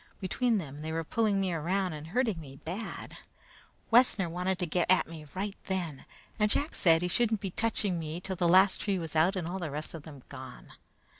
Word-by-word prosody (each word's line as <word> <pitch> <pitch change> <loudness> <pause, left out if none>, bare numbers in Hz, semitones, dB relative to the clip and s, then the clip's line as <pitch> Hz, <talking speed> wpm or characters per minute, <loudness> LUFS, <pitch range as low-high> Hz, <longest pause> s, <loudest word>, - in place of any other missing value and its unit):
Between 225 +4 +1
them 150 -5 -6
they 160 +1 -4
were 165 0 -1
pulling 210 +2 +1
me 190 -2 0
around 180 +3 0
and 155 0 -7
hurting 215 -2 0
me 135 -3 -10
bad. 180 +10 -6 0.7
Wessner 225 -6 +5
wanted 180 +2 -1
to 180 - -1
get 175 +2 0
at 185 - +5
me 155 -2 -9
right 200 +1 -2
then, 175 -8 -3 0.3
and 210 0 +4
Jack 290 +8 0
said 165 -1 +4
he - - +1
shouldn't 220 +3 +2
be 195 -2 -4
touching 205 -4 0
me 160 +1 -4
till 190 +1 -4
the 175 -1 +1
last 190 +3 +5
tree 200 -2 0
was 165 -3 -5
out 170 +5 +4
and 175 -3 -2
all 185 +2 -3
the 170 -4 -3
rest 150 +2 -4
of 165 - -6
them 145 -4 -12
gone. 130 -2 -10
180 Hz, 215 wpm, -30 LUFS, 160-195 Hz, 0.7 s, Wessner